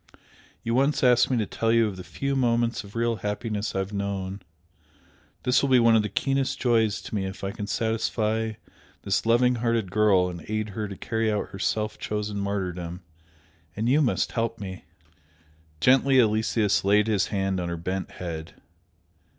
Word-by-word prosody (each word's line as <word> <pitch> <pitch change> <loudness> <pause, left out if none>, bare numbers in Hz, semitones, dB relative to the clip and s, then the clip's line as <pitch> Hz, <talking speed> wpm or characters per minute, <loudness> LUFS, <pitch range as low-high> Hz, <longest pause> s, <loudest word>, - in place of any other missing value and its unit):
You 115 - -1
once 140 +3 +2
asked 125 -1 +5
me 130 - +1
to 110 - +1
tell 115 +3 -1
you 115 0 +4
of 105 -3 -3
the 90 - -8
few 140 +7 -3
moments 120 -2 +1
of 100 +1 -14
real 115 0 0
happiness 105 0 -3
I - - 0
have 95 +1 -3
known, 100 -1 -3 1.0
this 125 0 +3
will 140 - 0
be 130 - +6
one 115 -1 +5
of 110 - +5
the 105 - -3
keenest 135 +6 0
joys 110 -4 +2
to - - -9
me 95 -2 -1
if 95 +1 -8
I 95 - -2
can 100 0 -6
satisfy 110 0 -1 0.5
this 100 +2 0
loving 125 +2 +4
hearted 115 -5 0
girl 100 -3 +4
and 85 -3 -7
aid 110 0 -2
her 105 +1 -4
to 100 -1 -8
carry 110 -1 -1
out 105 - -2
her 95 - -9
self 105 +2 -1
chosen 105 -1 -3
martyrdom. 90 -3 -3 0.7
And 110 +3 -1
you 140 +5 +4
must 130 - +1
help 115 -1 -2
me!" 95 -3 -7 0.9
Gently 130 - +5
Aloysius 110 -2 +2
laid 100 +2 +4
his 105 -3 +1
hand 95 -2 -1
on 85 -1 -3
her 85 - -3
bent 95 +3 -3
head. 80 -3 -6
105 Hz, 185 wpm, -26 LUFS, 100-115 Hz, 1.0 s, be